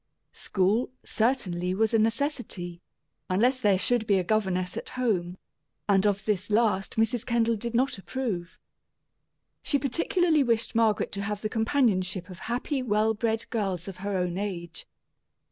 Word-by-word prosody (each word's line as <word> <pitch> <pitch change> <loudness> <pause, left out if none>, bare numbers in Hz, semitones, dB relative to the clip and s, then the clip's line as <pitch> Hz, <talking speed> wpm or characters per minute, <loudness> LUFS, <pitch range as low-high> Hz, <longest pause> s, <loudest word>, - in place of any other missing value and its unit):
School, 200 +5 +1 0.2
certainly, 185 -7 0
was 220 +2 +1
a 225 - +4
necessity, 220 - -1 0.5
unless 245 +8 +2
there 205 -4 +4
should 225 +3 0
be 200 - +4
a 185 - +1
governess 185 -3 0
at - - -5
home; 185 -8 0 0.5
and 200 0 +4
of 200 0 0
this 205 -2 -1
last 210 -3 +1
Mrs. 225 +1 +1
Kendall 230 -1 +1
did 235 +2 -4
not 255 -3 +1
approve. 195 -7 -4 1.0
She 285 - +1
particularly 320 +4 +2
wished 230 -3 +1
Margaret 225 -2 +2
to 200 - -4
have 205 +1 -3
the 215 - 0
companionship 210 -6 +1
of 180 - -10
happy, 255 +4 -2
well 220 -2 +2
bred 225 +1 -1
girls 195 -7 -2
of 190 -2 -7
her 200 +1 -2
own 180 0 -1
age. 170 -5 -5
215 Hz, 150 wpm, -27 LUFS, 185-235 Hz, 1.0 s, a